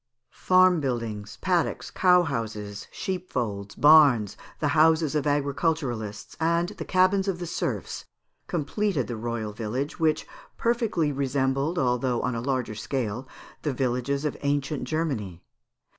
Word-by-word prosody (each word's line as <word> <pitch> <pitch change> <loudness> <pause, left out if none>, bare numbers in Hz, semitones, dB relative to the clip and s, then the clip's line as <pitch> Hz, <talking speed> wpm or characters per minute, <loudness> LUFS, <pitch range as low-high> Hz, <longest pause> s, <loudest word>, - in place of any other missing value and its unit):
"Farm 185 -1 +4
buildings, 115 -6 -3
paddocks, 175 -3 0
cow 180 -1 +5
houses, 110 -8 -4
sheepfolds, 120 - -4
barns, 145 -9 +6 0.2
the 150 - +1
houses 160 0 +4
of 150 -1 0
agriculturists, 140 -7 -1
and 170 +2 +1
the - - -7
cabins 190 +1 +3
of 190 -3 0
the 175 - -5
serfs, 170 - -3 0.4
completed 175 - -1
the 120 - -5
royal 110 -1 -4
village, 120 +7 -3
which 160 -1 +1 0.3
perfectly 230 - +1
resembled, 135 +3 0
although 125 -2 +1
on 125 - 0
a 115 - -3
larger 130 -3 -1
scale, 120 +1 -3 0.3
the 150 - -1
villages 130 +3 -1
of 150 - -1
ancient 140 0 -1
Germany. 120 - -3
140 Hz, 130 wpm, -26 LUFS, 120-165 Hz, 0.4 s, barns